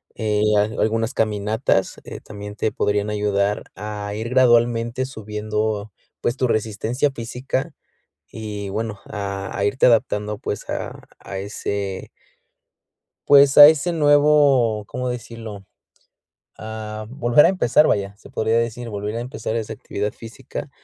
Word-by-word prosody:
Eh, 105 -2 0 0.2
al 105 +2 0
algunas 115 +1 0
caminatas, 105 -1 0
eh, - - -8
también 105 0 -9
te 110 - 0
podrían 105 0 0
ayudar 105 -1 0
a 105 0 -5
ir 110 +2 -4
gradualmente 120 0 +3
subiendo, 105 -2 -3 0.3
pues, 120 - 0
tu 130 - +1
resistencia 110 +4 0
física, 130 +5 -4 0.6
y 105 -2 -6
bueno, 105 -1 -4
a 100 -2 -5
a 100 - 0
irte 115 +6 +3
adaptando, 105 -3 +1
pues, 105 - -5
a - - -5 0.2
a 95 - -7
ese 100 -1 -4 1.2
pues, 140 -1 +6
a 145 0 +12
ese 160 +3 +2
nuevo, 145 -7 +4
¿cómo 125 +4 -4
decirlo? 115 -4 -7 0.9
Ah, 110 -1 -7
volver 120 +2 +4
a - - +5
empezar, 155 -5 +3
vaya, 100 -1 0
se - - -16
podría 110 +1 0
decir, 115 +1 -2
volver 105 +1 -4
a - - -2
empezar 115 -2 -4
esa 110 -1 -3
actividad 105 -1 -4
física, 120 +5 -8
110 Hz, 135 wpm, -22 LUFS, 105-120 Hz, 1.2 s, a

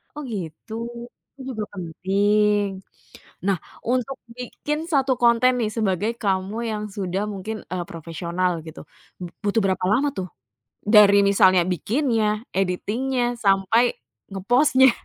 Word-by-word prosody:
Oh 295 - -6
gitu, 200 -2 -7 0.6
itu 275 - -12
juga 220 -4 -3
penting. 200 +3 +1 0.6
Nah, 195 -2 +2 0.3
untuk 255 +2 0 0.2
bikin 295 +4 -4
1 270 -3 +3
konten 235 +1 +5
nih 215 -1 -1
sebagai 210 -1 0
kamu 195 +1 -1
yang 210 0 -3
sudah 190 0 -2
mungkin, 215 +3 -6
eee, 180 -1 -2
profesional 170 +2 -2 0.2
gitu, 160 - -9 0.4
bu 180 - -4 0.2
butuh 205 +2 +2
berapa 185 -1 0
lama 275 +7 +2
tuh? 185 - -3 0.6
Dari 205 -1 +7
misalnya 185 -2 +5
bikinnya, 220 - 0
editing-nya, 230 +7 -1 0.2
sampai 195 +5 +3 0.4
nge-post-nya. 255 +7 +4
205 Hz, 120 wpm, -23 LUFS, 190-235 Hz, 0.6 s, Dari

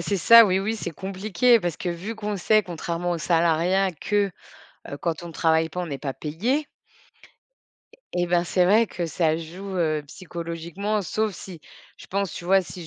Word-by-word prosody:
c'est 195 +4 -1
ça, 230 +5 +8
oui 185 -1 +2
oui, 205 +3 -1
c'est 195 -6 -5
compliqué 195 +6 +1
parce 175 -4 -2
que 180 - -3
vu 185 +7 -5
qu'on 210 -1 -4
sait 215 +4 +3
contrairement 175 -1 -4
aux 170 - -2
salariat 170 +3 +2
que, 200 +5 0 0.6
heu, 140 - -5
quand 170 +1 -3
on 170 - -8
travaille 160 0 +2
pas, 180 +3 -5
on 180 - -3
n'est 140 -4 -5
pas 135 -2 -4
payé 235 - -2 1.5
et 175 0 +1
ben 175 0 +2
c'est 180 +1 +2
vrai 220 +5 +5
que 175 -4 -4
ça 160 -1 0
joue, 175 +5 -8
heu, 155 -3 0
psychologiquement 170 +5 -4
sauf 215 +2 -1
si 175 -2 -10 0.4
je - - -13
pense 200 -1 -2
tu - - -7
vois, 190 +2 +4
si 180 -2 -9
180 Hz, 185 wpm, -24 LUFS, 165-200 Hz, 1.5 s, ça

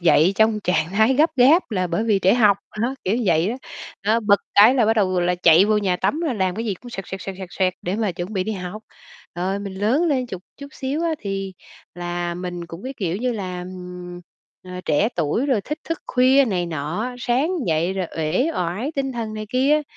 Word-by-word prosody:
dậy 170 +1 +4
trong 220 -1 +3
trạng 165 -4 0
thái 220 +6 +3
gấp 310 +5 +4
gáp 275 +5 +5
là 185 -4 0
bởi 175 +6 -1
vì 215 -3 +3
trễ 190 - +5
học, 210 -5 +5 0.3
đó, 255 +3 0
kiểu 195 +5 +1
vậy 170 +1 +2
đó. 235 - -2 0.5
Đó, 220 +3 +3
bật 205 -2 +3
cái 220 +6 +7
là 240 -5 +3
bắt 225 - +4
đầu 185 -3 +2
là 175 +1 +1
chạy 175 +1 +6
vô 215 0 +2
nhà 185 -3 0
tắm 305 - 0
rồi 315 -7 -1
làm 190 -3 0
cái 225 +2 -3
gì 210 - -1
cũng 245 +6 -13
xoẹt, 195 -4 -6
xoẹt, 190 - -6
xoẹt, 190 0 -6
xoẹt, 190 -2 -7
xoẹt 185 -1 +1
để 180 +3 -2
mà 215 -4 0
chuẩn 175 +5 -6
bị 185 -2 -1
đi 220 - -2
học. 190 +2 -6 0.5
Rồi 185 +3 -1
mình 200 -1 -6
lớn 215 - +1
lên 265 -6 +1
chụt 185 -5 -7 0.2
chút 280 0 -9
xíu 275 +5 -3
á, 335 - +1
thì 195 -1 -4 0.4
là 175 0 -3
mình 175 -1 -5
cũng 165 +2 -10
cái, 265 +2 -5
kiểu 180 -3 -2
như 245 +3 -1
là, 185 -4 -4
ừm, 180 -1 -8 0.4
ờ, 180 0 -7
trẻ 160 +9 +2
tuổi 170 - 0
rồi 255 -7 +2
thích 300 +9 -5
thức 330 - -1
khuya 260 +2 +4
này 185 -7 -1
nọ 160 +4 -3
á, 250 +1 -4
sáng 250 +7 +1 0.2
dậy 165 +2 +1
rồi 190 -2 -2
uể 165 - +1
oải 180 - -2
tinh 270 -1 -1
thần 225 -3 -4
này 215 0 -5
kia. 275 +6 +2
200 Hz, 235 wpm, -22 LUFS, 180-240 Hz, 0.5 s, cái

